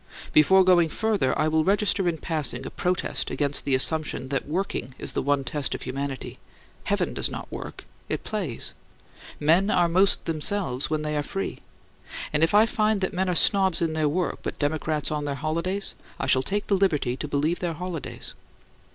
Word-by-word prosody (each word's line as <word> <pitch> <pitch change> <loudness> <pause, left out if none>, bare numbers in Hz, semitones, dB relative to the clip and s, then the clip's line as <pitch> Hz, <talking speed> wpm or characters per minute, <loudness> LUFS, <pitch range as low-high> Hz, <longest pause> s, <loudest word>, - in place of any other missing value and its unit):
Before 190 +6 +6
going 175 -3 +4
further, 210 - 0
I 155 - +2
will 155 0 +2
register 195 0 +2
in 165 - -2
passing 145 -6 -1
a - - -6
protest 180 0 -1
against 145 -1 0
the 135 - +3
assumption 150 -1 +1
that 135 -1 -2
working 150 -7 -3
is - - -2
the - - 0
one 140 0 +1
test 145 -1 -2
of - - -7
humanity. 140 0 -5 0.5
Heaven - - 0
does - - 0
not - - -7
work; - - -7 0.2
it - - -2
plays. - - -3 0.7
Men 170 +7 +3
are 175 -4 +3
most 185 +4 +3
themselves 160 -4 -1
when 155 -1 -1
they 150 0 -2
are 150 - +1
free; 195 +6 -4 0.7
and 150 - +2
if 165 +5 +3
I 215 +2 +7
find 215 -2 +1
that 190 - -1
men 185 +1 0
are 180 - 0
snobs 190 0 +4
in 165 -2 0
their 155 -1 +1
work 175 +4 -1
but - - -4
democrats 155 +1 -1
on 150 -1 -2
their 140 -1 -2
holidays, 170 +7 -1 0.3
I - - -1
shall 130 - +3
take 205 +8 -2
the 200 - +2
liberty 150 -10 +1
to 150 - -4
believe 150 +4 0
their 175 -2 -2
holidays. 170 -2 -6
160 Hz, 190 wpm, -25 LUFS, 145-185 Hz, 0.7 s, I